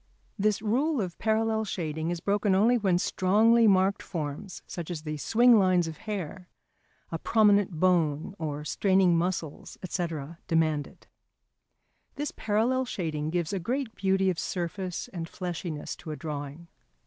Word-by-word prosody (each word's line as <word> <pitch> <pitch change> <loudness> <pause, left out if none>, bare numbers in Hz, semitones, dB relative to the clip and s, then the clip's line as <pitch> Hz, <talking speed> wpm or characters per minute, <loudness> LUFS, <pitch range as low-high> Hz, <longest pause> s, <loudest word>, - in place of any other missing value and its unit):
This 210 +1 +1
rule 270 +7 +1
of 180 -5 -4
parallel 220 0 +1
shading 160 -5 -3
is 175 -1 -3
broken 200 0 +1
only 225 +6 +4
when 195 -6 +2
strongly 220 +6 +4
marked 195 0 +3
forms, 155 +2 -5
such 170 -2 -6
as 165 -4 -5
the 155 -1 -4
swing 235 - +5
lines 185 -3 +3
of 160 -1 -7
hair, 185 -2 -5 0.6
a 165 - -3
prominent 205 -2 +3
bone 165 -2 +2
or 150 -2 -4
straining 185 +5 +3
muscles, 165 -3 -3
&c., 175 0 -1 0.4
demand 155 -3 +1
it. - - -19 1.1
This 290 0 -3
parallel 230 +5 +1
shading 155 -9 -3
gives 175 +2 -1
a 195 - -1
great 245 +5 -2
beauty 190 -1 +2
of 170 - -5
surface 180 +1 -3
and 165 -3 -6
fleshiness 175 -4 -5
to - - -10
a 155 - -3
drawing. 150 +1 -6
185 Hz, 150 wpm, -28 LUFS, 165-210 Hz, 1.1 s, swing